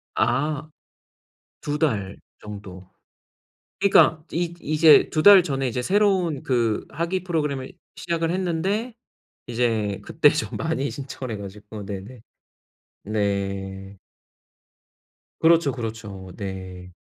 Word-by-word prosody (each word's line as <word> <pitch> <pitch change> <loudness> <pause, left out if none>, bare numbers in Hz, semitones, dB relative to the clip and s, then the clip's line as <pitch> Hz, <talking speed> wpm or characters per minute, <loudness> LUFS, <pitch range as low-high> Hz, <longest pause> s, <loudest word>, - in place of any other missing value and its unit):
아 150 +2 0 0.9
2 145 0 -2
달 100 -11 -1 0.3
정도. 100 -3 -9 0.9
그러니까 180 -5 +5
이 170 +1 -1
이제 155 0 +5
2 155 - 0
달 200 -1 +9
전에 135 -5 -2
이제 125 0 -2
새로운 185 -4 +2
그 115 -4 0
학위 170 +5 -2
프로그램을 150 -7 -2 0.2
시작을 165 -1 -1
했는데 190 +6 -1 0.5
이제 115 -4 -1
그때 - - +4
좀 - - -3
많이 160 -4 -1
신청을 130 -3 -6
해 - - -9
가지고 105 +1 -9
네네 100 +5 -7 0.8
네. 100 -1 -3 1.4
그렇죠, 165 -3 +4
그렇죠. 110 -6 -7
네. 95 -2 -7
130 Hz, 200 characters per minute, -24 LUFS, 100-165 Hz, 1.4 s, 달